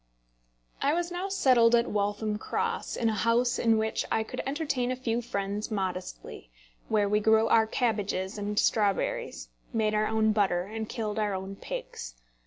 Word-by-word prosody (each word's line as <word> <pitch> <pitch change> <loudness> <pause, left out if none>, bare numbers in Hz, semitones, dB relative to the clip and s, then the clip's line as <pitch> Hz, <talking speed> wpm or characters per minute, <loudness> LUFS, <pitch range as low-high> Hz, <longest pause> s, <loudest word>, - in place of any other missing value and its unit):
I 285 +3 +2
was 350 0 -1
now 360 +2 -3
settled 250 -11 +5
at 235 0 +3
Waltham 210 +1 -1
Cross, - - -2
in 230 - 0
a 220 - +2
house 235 +3 +2
in 225 -1 +3
which 220 0 0
I 220 - +2
could - - -5
entertain 275 -4 -1
a - - -1
few 240 -2 -1
friends 205 -2 -3
modestly, 185 - -5 0.4
where 210 -2 +2
we 210 +1 +2
grew 220 +1 +4
our 220 -1 +5
cabbages 205 -5 -1
and 205 0 -3
strawberries, 225 - 0 0.2
made 220 -3 +1
our 215 0 +2
own 220 0 +2
butter, 195 -4 +2
and 220 +3 -6
killed 220 -2 -3
our 205 -2 0
own 190 +1 -5
pigs. - - -7
220 Hz, 170 wpm, -28 LUFS, 205-235 Hz, 0.4 s, settled